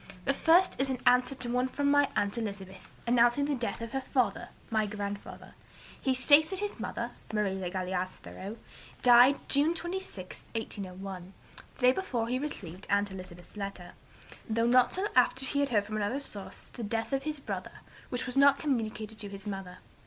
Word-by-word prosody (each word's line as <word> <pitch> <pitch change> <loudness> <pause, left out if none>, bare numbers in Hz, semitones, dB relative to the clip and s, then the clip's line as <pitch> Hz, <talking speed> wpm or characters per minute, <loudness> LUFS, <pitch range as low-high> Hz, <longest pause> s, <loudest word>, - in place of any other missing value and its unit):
The - - +3
first 345 -1 +4
is 270 - +1
in 260 - -1
answer 250 +2 +4
to 250 -2 -4
one 250 +1 +1
from 285 +2 0
my 285 -1 +4
aunt 200 -1 +1
Elizabeth, 195 -4 -6
announcing 240 +3 +4
the 290 - 0
death 235 -3 -3
of 230 - -6
her 270 - -1
father 235 -3 0 0.2
(my 220 -1 +2
grandfather). 200 -1 -6 0.5
He 265 -1 +1
states 290 +4 +6
that 385 - -3
his 410 - -2
mother 235 +1 -3 0.2
(Marie 210 -3 0
(le 190 -2 -3
Galais) 185 0 -2
Thoreau) 195 +3 -9 0.5
died 245 +3 +7
June 295 +4 +3
26, 345 - -5
1801, 190 -3 -5 0.4
the - - -16
day 250 0 +7
before 250 -9 -2
he 255 +1 0
received 195 - -6
aunt 200 0 +2
Elizabeth's 185 -1 -10
letter, 195 -3 -6 0.6
though 230 +1 +2
not 250 +1 +5
till 380 +3 -1
after 255 +1 +4
he 280 - -1
had 285 -1 +2
heard 210 -4 +2
from 215 +1 -4
another 215 +6 -1
source 205 -8 -6
of - - -23
the 240 - -6
death 225 +4 -2
of 270 - +1
his 300 +1 -3
brother, - - -6 0.3
which 245 - -2
was 250 0 -3
not 280 0 +6
communicated 220 -6 -2
to 205 - -4
his 195 -1 -9
mother. 195 -3 -6
235 Hz, 190 wpm, -30 LUFS, 200-270 Hz, 0.6 s, died